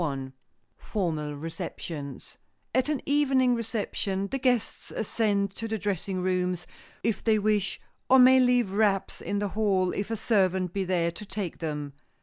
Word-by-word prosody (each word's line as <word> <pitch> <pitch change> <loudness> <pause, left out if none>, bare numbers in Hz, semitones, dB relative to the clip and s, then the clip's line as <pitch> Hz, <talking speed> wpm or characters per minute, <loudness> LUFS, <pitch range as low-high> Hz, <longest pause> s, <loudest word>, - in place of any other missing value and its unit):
[Sidenote: 135 -4 -2 0.5
FORMAL 155 -8 -2
RECEPTIONS] 155 -2 -7 0.3
At 260 +3 +2
an 300 -3 -1
evening 270 -3 +3
reception, 205 -4 -2
the 270 - -1
guests 245 -4 0
ascend 200 -2 0
to 225 +3 -4
the 220 0 -2
dressing 195 -2 -2
rooms, 180 -1 0 0.4
if 220 -4 0
they 220 -1 +4
wish, 210 -2 +1 0.3
or 265 - +8
may 260 +1 +8
leave 245 -5 +3
wraps 200 -2 +1
in 205 - -2
the 205 0 -1
hall, 195 -3 +1
if 200 +1 -3
a 225 - -2
servant 190 -5 +1
be 195 - 0
there 175 -2 +1
to 170 - -9
take 195 -3 -5
them. 150 -3 -4
200 Hz, 155 wpm, -28 LUFS, 180-225 Hz, 0.5 s, or